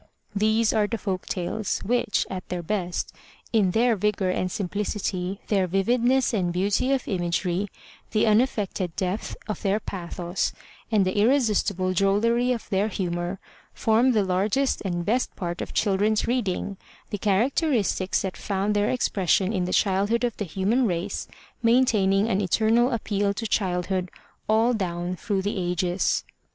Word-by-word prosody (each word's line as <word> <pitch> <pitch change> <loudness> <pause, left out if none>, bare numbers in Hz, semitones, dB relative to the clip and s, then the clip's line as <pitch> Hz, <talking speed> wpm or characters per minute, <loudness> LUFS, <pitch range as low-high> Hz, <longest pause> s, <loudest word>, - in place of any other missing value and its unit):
These 220 +2 +2
are 210 -2 +2
the 230 - -2
folk 190 -3 -3
tales, 195 +3 -2
which, 240 -1 +1
at 185 -1 -6
their 180 -1 -3
best, 180 -1 -2 0.4
in 210 -5 +4
their 230 +4 +3
vigor 195 -2 0
and 185 0 -1
simpli 200 +1 -2
city, 195 -2 -3
their 195 -3 +2
vividness 240 +8 +2
and 180 -5 +1
beauty 200 +8 +1
of 270 -2 0
imagery, 180 0 -1 0.4
the 215 - +2
unaffected 210 -6 +1
depth 190 +2 -2
of 215 -4 -4
their 200 +1 +1
pathos 175 -2 -3 0.4
and 205 -3 +3
the 185 - -1
irresistible 210 -6 +2
drollery 230 +6 +2
of 240 -3 -3
their 195 +2 +1
humor, 175 -2 -3 0.4
form 230 +4 +3
the 215 -3 +3
largest 205 +9 +1
and 175 -3 -2
best 245 +6 0
part 175 -2 -4
of - - -5
children's 210 +2 +1
reading, 205 -5 -1 0.3
the 205 - -3
characteristics 215 - +1
that 190 -1 -3
found 200 +1 -1
their 205 +1 +2
expression 195 -4 +1
in 185 -3 0
the 180 - -3
childhood 200 +5 +2
of 240 -3 0
the 205 - -2
human 200 +9 +1
race, 180 +2 -3 0.3
maintaining 225 -4 +3
an 200 -3 +1
eternal 225 +5 +3
appeal 205 -4 -1
to 225 - -4
childhood 185 -3 0 0.4
all 225 +3 +4
down 180 -4 -2
through 195 +1 -2
the 205 +1 -2
ages. 180 +1 0
200 Hz, 150 wpm, -25 LUFS, 185-225 Hz, 0.4 s, in